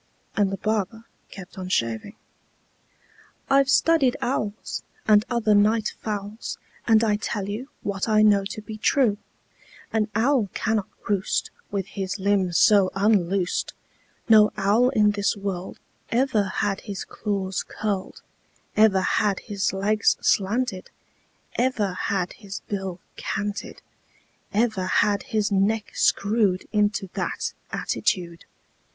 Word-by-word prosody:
And 200 -2 +2
the 195 - -3
barber 215 +2 -2 0.3
kept 190 0 -10
on 185 0 -5
shaving. 115 - -1 1.4
"I've 275 0 +5
studied 280 -2 +3
owls, 215 -4 -3 0.3
And 210 -1 +6
other 230 -3 +2
night 215 +2 +3
fowls, 210 +1 -4 0.3
And 225 -1 +5
I 210 -2 +2
tell 205 -2 -3
you 225 +7 -5
What 200 +2 -2
I 215 0 +5
know 205 -2 +5
to 215 +1 -6
be 215 +1 -7
true: 220 -4 +2 0.7
An 220 -1 +2
owl 235 -2 +2
cannot 220 -3 0 0.2
roost 200 -2 0 0.2
With 195 -2 -2
his 190 0 -4
limbs 190 -3 +1
so 200 -3 +5
unloosed; 195 -3 +1 0.5
No 215 -2 +7
owl 210 +5 +3
in 210 -5 +3
this 205 0 0
world 195 -2 -4 0.3
Ever 235 -4 +2
had 195 +1 -1
his 200 -3 -6
claws 195 -3 -2
curled, 205 -3 -4 0.5
Ever 210 -3 +5
had 200 +1 +1
his 200 -4 -1
legs 205 +2 +2
slanted, 205 0 0 0.7
Ever 235 -6 +1
had 185 -1 -2
his 200 -1 -8
bill 190 -3 -5 0.2
canted, 205 0 -4 0.7
Ever 210 -3 +1
had 205 +2 +2
his 215 -1 -1
neck 205 +2 +1
screwed 200 -3 +2
Into 205 -2 +1
that - - -3 0.2
attitude. 170 -3 -2
205 Hz, 125 wpm, -24 LUFS, 195-220 Hz, 1.4 s, No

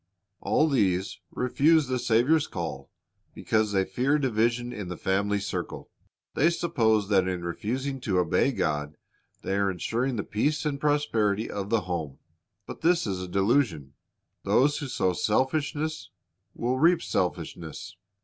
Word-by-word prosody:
All 155 - +2
these 95 - 0
refuse 150 +5 +3
the 130 -1 -1
Saviour's 125 +8 +3
call 70 -5 -5 0.5
because 110 -1 0
they 95 -1 +2
fear 130 +10 +1
division 120 -2 0
in 100 -3 -6
the 90 -1 -6
family 100 +1 0
circle. 100 - -5 0.4
They 155 +5 +3
suppose 110 - +1
that 95 -3 +3
in 90 -2 -3
refusing 130 +10 -3
to 95 -6 0
obey 90 +9 +2
God 75 - -2 0.5
they 95 - -2
are 100 0 +2
insuring 115 +8 -1
the 105 - -2
peace 145 +10 -1
and 145 -2 -1
prosperity 115 -8 +1
of 100 -1 -4
the 115 -1 +2
home; 85 -6 -4 0.5
but - - -9
this 170 +1 +3
is 95 -3 -3
a 90 - -5
delusion. 95 - +1 0.5
Those 145 +3 +3
who 145 - -4
sow 95 -7 0
selfishness 145 - -1 0.5
will 125 +2 -1
reap 170 +3 +4
selfishness. 85 +1 -3
110 Hz, 145 wpm, -27 LUFS, 95-140 Hz, 0.5 s, reap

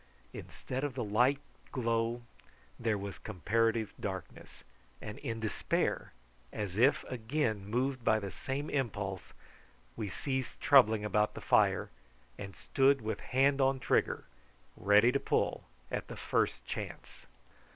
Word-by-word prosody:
Instead 130 +2 -6
of 145 -3 -2
the 125 - -2
light 125 +7 +3 0.3
glow 115 -1 0 0.6
there 115 -3 +1
was 100 -1 -6
comparative 110 +3 0
darkness, 95 -5 -7 0.4
and 105 - -7
in 115 -5 -4
despair, 110 -3 -1 0.4
as 100 -4 -4
if 130 +7 +4
again 110 -4 -2
moved 130 +3 -1
by 110 - +4
the 100 -3 -4
same 140 +3 -4
impulse, 100 -9 -2 0.6
we 105 -3 -3
ceased 130 +5 -3
troubling 110 -6 +5
about 105 0 +1
the - - -5
fire, - - +3 0.5
and 95 -2 -7
stood 135 0 +3
with 110 0 -3
hand 135 +2 +2
on 135 0 +3
trigger, - - +1 0.5
ready 105 +4 +5
to 140 - +1
pull - - 0 0.3
at - - -3
the - - -8
first - - 0
chance. - - -7
115 Hz, 130 wpm, -32 LUFS, 105-130 Hz, 0.6 s, troubling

